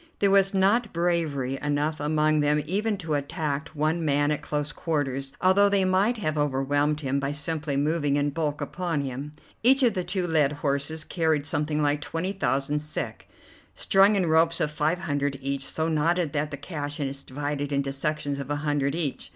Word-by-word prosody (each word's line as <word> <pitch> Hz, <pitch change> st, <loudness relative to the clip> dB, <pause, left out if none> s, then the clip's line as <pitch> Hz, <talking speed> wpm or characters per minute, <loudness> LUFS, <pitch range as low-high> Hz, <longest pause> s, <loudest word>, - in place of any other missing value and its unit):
There 200 Hz, -1 st, +3 dB
was 195 Hz, -1 st, +5 dB
not 205 Hz, +4 st, +2 dB
bravery 160 Hz, -6 st, 0 dB
enough 150 Hz, +1 st, -1 dB
among 155 Hz, +1 st, +2 dB
them 150 Hz, 0 st, +2 dB
even 205 Hz, +5 st, -1 dB
to 165 Hz, -5 st, -4 dB
attack 145 Hz, +1 st, -2 dB
one 155 Hz, +3 st, 0 dB
man 145 Hz, 0 st, +2 dB
at 150 Hz, -, -1 dB
close 150 Hz, 0 st, -2 dB
quarters, 140 Hz, -4 st, -2 dB
although 200 Hz, +2 st, +5 dB
they 200 Hz, -1 st, +2 dB
might 195 Hz, +6 st, +2 dB
have 155 Hz, -7 st, -1 dB
overwhelmed 145 Hz, +2 st, +1 dB
him 135 Hz, -1 st, 0 dB
by 140 Hz, +1 st, -2 dB
simply 150 Hz, -1 st, -2 dB
moving 145 Hz, 0 st, +1 dB
in 145 Hz, 0 st, +1 dB
bulk 150 Hz, -1 st, -2 dB
upon 175 Hz, -5 st, -2 dB
him. 135 Hz, +2 st, -5 dB, 0.3 s
Each 265 Hz, +3 st, +5 dB
of 235 Hz, -4 st, +4 dB
the 185 Hz, -2 st, -2 dB
two 180 Hz, +1 st, -1 dB
led 155 Hz, -4 st, +2 dB
horses 145 Hz, +2 st, -2 dB
carried 160 Hz, -3 st, 0 dB
something 150 Hz, +1 st, -1 dB
like 145 Hz, 0 st, +1 dB
twenty 165 Hz, +5 st, -3 dB
thousand 145 Hz, -6 st, 0 dB
sek, 150 Hz, +1 st, -5 dB, 0.5 s
strung 195 Hz, +2 st, +4 dB
in 190 Hz, -3 st, +2 dB
ropes 165 Hz, +1 st, +4 dB
of 150 Hz, -, 0 dB
five 150 Hz, +3 st, 0 dB
hundred 145 Hz, -5 st, -1 dB
each, 140 Hz, 0 st, -2 dB
so 160 Hz, 0 st, -1 dB
knotted 165 Hz, 0 st, +1 dB
that 150 Hz, 0 st, -1 dB
the 145 Hz, -, -6 dB
cash 145 Hz, -1 st, -5 dB
is 140 Hz, -1 st, -3 dB
divided 145 Hz, +1 st, -4 dB
into 140 Hz, -1 st, 0 dB
sections 145 Hz, 0 st, -2 dB
of 140 Hz, 0 st, -6 dB
a 145 Hz, -, 0 dB
hundred 145 Hz, -1 st, 0 dB
each. 155 Hz, -5 st, -3 dB
150 Hz, 185 wpm, -26 LUFS, 145-170 Hz, 0.5 s, was